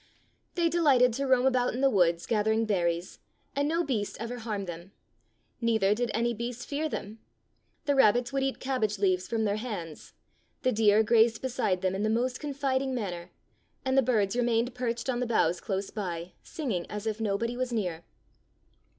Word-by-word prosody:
They 345 -1 +2
delighted 280 -8 +4
to 275 +3 -2
roam 260 -1 +4
about 250 -2 +2
in 255 - -3
the 275 - +5
woods 170 -4 +2
gathering 220 0 +1
berries, 175 -4 -1 0.4
and 285 +1 +1
no 335 +3 +1
beast 225 -9 -2
ever 235 +2 -5
harmed 215 -4 -3
them. 175 +2 -8 0.7
Neither 220 -4 +3
did 240 +2 -1
any 235 +2 0
beast 235 +2 -5
fear 305 +2 -2
them. 215 -4 -6 0.7
The 285 - +2
rabbits 245 -1 +4
would 275 - +1
eat 270 0 -1
cabbage 235 -6 -1
leaves 185 -2 +1
from 225 -1 -1
their 205 -1 0
hands, 200 -9 -6 0.5
the 255 - +3
deer 215 -1 +4
grazed 225 +1 +3
beside 235 -8 0
them 185 0 +1
in 195 - -2
the 215 - +1
most 245 +3 0
confiding 275 -2 -1
manner, 180 -7 -4 0.6
and 260 0 +1
the 270 - +6
birds 220 -5 +1
re 245 - +2
mained 235 +1 +1
perched 240 -1 -3
on 250 -2 0
the 250 - -1
boughs 175 -6 +2
close 195 -1 -3
by, 175 -4 -4
singing 230 - -3
as 210 0 -5
if 220 0 -2
nobody 225 +3 -1
was 255 0 -2
near. 180 -8 -2
230 Hz, 185 wpm, -29 LUFS, 200-255 Hz, 0.7 s, the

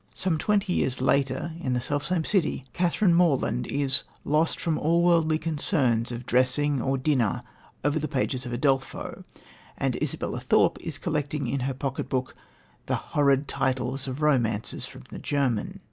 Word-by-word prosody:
Some 175 -4 0
twenty 200 -2 +1
years 130 -1 0
later, 135 +4 +1
in 130 -7 -1
the 125 - +1
self 145 +4 -2
same 170 -2 0
city, 190 -9 +1
Catherine 175 +1 +2
Morland 150 - +2
is 140 -1 0 0.2
"lost 155 +3 +2
from 160 -2 0
all 170 +2 +2
worldly 165 -3 +4
concerns 140 - +1
of 120 0 -6
dressing 130 +3 +2
or 135 +2 0
dinner 130 -6 +1 0.4
over 145 +2 +1
the 155 - -2
pages 130 -1 -1
of 125 - -6
Udolpho," 135 +2 -1 0.5
and - - -1
Isabella - - -2
Thorpe - - +3
is - - -5
collecting 150 -1 -2
in 140 - -1
her 130 +1 -2
pocket 135 0 -3
book 130 -1 -2 0.5
the - - +1 0.2
"horrid" 140 -1 +3
titles 130 +1 -1
of 135 +3 -4
romances 115 -8 +1
from - - -12
the - - -7
German. 135 -7 -1
140 Hz, 160 wpm, -26 LUFS, 130-155 Hz, 0.5 s, worldly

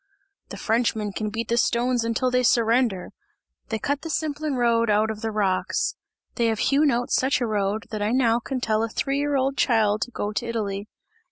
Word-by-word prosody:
"The - - -7
Frenchmen 220 -2 0
can 215 +2 -3
beat 225 +2 -4
the 235 - +1
stones 240 0 +1
until 230 +2 0
they 250 0 +2
surrender! 230 -4 +2 0.6
they 220 - -1
cut 285 +6 -2
the 325 - -6
Simplon 305 -1 -2
road 230 -2 +2
out 215 +1 +2
of 215 -1 -8
the 225 - -2
rocks 200 -4 0 0.4
they 235 -2 +2
have 225 -1 0
hewn 285 +6 +3
out 245 -1 -1
such 260 +1 +2
a 245 - 0
road, 210 0 -1
that 215 -2 -4
I 205 - +1
now 235 -1 +2
can 260 +2 -4
tell 220 -2 +1
a 225 - -1
three 275 +5 -1
year 290 0 0
old 270 +1 0
child 215 -4 +2
to - - -1
go 210 -3 -3
to 235 - -2
Italy! 205 -3 -3
230 Hz, 205 wpm, -24 LUFS, 215-255 Hz, 0.6 s, hewn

